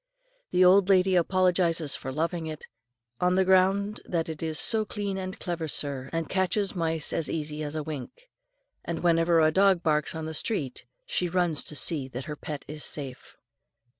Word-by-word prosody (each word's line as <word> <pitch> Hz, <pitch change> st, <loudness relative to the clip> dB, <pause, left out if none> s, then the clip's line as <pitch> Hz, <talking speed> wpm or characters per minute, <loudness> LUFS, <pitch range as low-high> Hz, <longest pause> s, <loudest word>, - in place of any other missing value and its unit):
The 180 Hz, +1 st, +4 dB
old 190 Hz, +1 st, +5 dB
lady 190 Hz, -1 st, +4 dB
apologises 175 Hz, -3 st, +2 dB
for 130 Hz, -, -6 dB
loving 165 Hz, +3 st, -2 dB
it, 155 Hz, -1 st, -7 dB, 0.5 s
on 180 Hz, 0 st, +2 dB
the 190 Hz, 0 st, +3 dB
ground 195 Hz, +3 st, +3 dB
that 165 Hz, -2 st, -2 dB
it 160 Hz, -2 st, -6 dB
is 160 Hz, -1 st, -2 dB
"So 220 Hz, +4 st, +4 dB
clean 205 Hz, -2 st, -4 dB
and 190 Hz, +2 st, -5 dB
clever, 170 Hz, -3 st, -3 dB
sir, 140 Hz, -3 st, -3 dB
and 165 Hz, -1 st, -2 dB
catches 190 Hz, +2 st, 0 dB
mice 160 Hz, -3 st, 0 dB
as 160 Hz, -, 0 dB
easy 150 Hz, -1 st, -3 dB
as 155 Hz, +1 st, -3 dB
wink;" 155 Hz, -, -7 dB, 0.6 s
and 170 Hz, 0 st, -4 dB
whenever 165 Hz, -1 st, +3 dB
a 155 Hz, 0 st, +4 dB
dog 190 Hz, 0 st, +3 dB
barks 150 Hz, 0 st, +1 dB
on 160 Hz, -1 st, -4 dB
the 160 Hz, -, -5 dB
street, 150 Hz, -, -1 dB, 0.2 s
she 180 Hz, -, -1 dB
runs 175 Hz, -4 st, +1 dB
to 150 Hz, -, -6 dB
see 145 Hz, 0 st, +1 dB
that 130 Hz, 0 st, -7 dB
her 150 Hz, -, -5 dB
pet 145 Hz, -1 st, -7 dB
is 150 Hz, 0 st, -6 dB
safe. 135 Hz, -4 st, -6 dB
165 Hz, 180 wpm, -27 LUFS, 155-185 Hz, 0.6 s, old